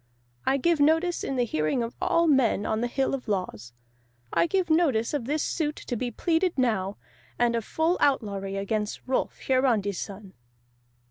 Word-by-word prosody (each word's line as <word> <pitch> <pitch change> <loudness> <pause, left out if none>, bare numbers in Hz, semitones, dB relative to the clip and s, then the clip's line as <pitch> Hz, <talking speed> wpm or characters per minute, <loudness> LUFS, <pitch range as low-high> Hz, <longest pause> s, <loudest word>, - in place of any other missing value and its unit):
I 270 - +3
give 335 +3 +2
notice 325 +4 +2
in 270 - -2
the 245 -1 +1
hearing 155 +4 0
of 230 - -6
all 335 - +3
men 265 -9 +3
on 220 +1 -1
the 240 - +1
Hill 270 +3 -1
of 265 -2 -4
Laws. 180 - -3 0.6
I - - +3
give 375 +1 +1
notice 285 -9 +2
of 285 -6 -2
this 300 +4 0
suit 305 -3 -1
to 245 - -5
be 245 +2 -2
pleaded 335 - 0
now, 210 -6 0 0.4
and 240 -1 +2
of 230 - -1
full 320 - 0
outlawry 200 -9 0
against 210 +1 -2
Rolf 260 0 -1
Hiarandi's 235 -7 +1
son." 195 -1 -8
245 Hz, 175 wpm, -26 LUFS, 210-300 Hz, 0.6 s, I